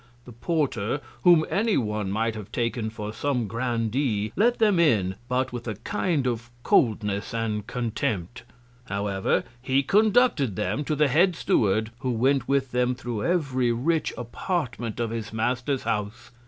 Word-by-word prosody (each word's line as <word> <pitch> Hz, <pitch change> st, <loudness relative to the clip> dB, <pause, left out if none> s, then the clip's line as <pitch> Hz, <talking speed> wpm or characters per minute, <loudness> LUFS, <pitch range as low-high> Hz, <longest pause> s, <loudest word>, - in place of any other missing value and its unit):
The 125 Hz, -, -11 dB
Porter, 130 Hz, -2 st, -1 dB, 0.2 s
whom 170 Hz, -3 st, +6 dB
any 220 Hz, +1 st, +1 dB
One 105 Hz, -4 st, -1 dB
might 110 Hz, +3 st, 0 dB
have 105 Hz, -3 st, -8 dB
taken 115 Hz, -1 st, -1 dB
for 105 Hz, -1 st, -6 dB
some 125 Hz, -1 st, -1 dB
Grandee, 115 Hz, -1 st, -1 dB
let 235 Hz, +5 st, +3 dB
them 210 Hz, -5 st, +3 dB
in, 105 Hz, -, +3 dB, 0.2 s
but 130 Hz, 0 st, 0 dB
with 120 Hz, 0 st, -6 dB
a 110 Hz, -, -2 dB
kind 155 Hz, -, -1 dB
of 120 Hz, -1 st, -2 dB
Coldness 105 Hz, -2 st, +1 dB
and 110 Hz, -2 st, -2 dB
Contempt. 115 Hz, -3 st, -2 dB, 0.4 s
However, 100 Hz, 0 st, 0 dB, 0.2 s
he 135 Hz, +2 st, +1 dB
conducted 205 Hz, -, +3 dB
them 105 Hz, +13 st, -1 dB
to 155 Hz, -, 0 dB
the 150 Hz, 0 st, +3 dB
Head 170 Hz, +7 st, +3 dB
Steward, 110 Hz, -, +1 dB
who 130 Hz, -, -2 dB
went 125 Hz, +2 st, +1 dB
with 135 Hz, -2 st, +1 dB
them 125 Hz, 0 st, +1 dB
thro' 120 Hz, -3 st, -4 dB
every 135 Hz, -8 st, +1 dB
rich 155 Hz, +8 st, 0 dB
Apartment 120 Hz, -, -3 dB
of 115 Hz, -1 st, -1 dB
his 115 Hz, -2 st, -4 dB
Master's 125 Hz, +4 st, -1 dB
House. 105 Hz, +3 st, -3 dB
120 Hz, 155 wpm, -25 LUFS, 110-140 Hz, 0.4 s, whom